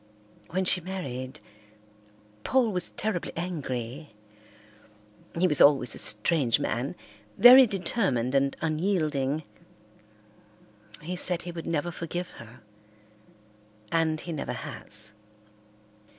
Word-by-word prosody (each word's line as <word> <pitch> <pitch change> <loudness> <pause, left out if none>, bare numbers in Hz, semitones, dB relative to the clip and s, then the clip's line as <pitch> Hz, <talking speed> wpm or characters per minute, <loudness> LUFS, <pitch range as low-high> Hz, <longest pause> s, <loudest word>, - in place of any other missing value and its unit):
When 185 +2 -1
she 180 0 +5
married, 145 -7 -6 1.0
Paul 255 -4 +2
was 180 -2 -1
terribly 210 -5 -3
angry. 145 -6 -5 1.2
He 180 - +3
was 150 -4 +2
always 135 -5 +5
a - - -5
strange 120 +3 +2
man, 125 +8 -2 0.4
very 255 +2 +9
determined 180 - -1
and 135 0 +1
unyielding. 155 -4 0 1.6
He 180 +3 -4
said 180 -1 -1
he 175 - -6
would 165 -1 -7
never 165 +1 -1
forgive 175 +1 -5
her, 115 0 -14 1.3
and 160 -1 +1
he 170 - -7
never 145 - -4
has. 105 0 -4
160 Hz, 105 wpm, -27 LUFS, 135-180 Hz, 1.6 s, very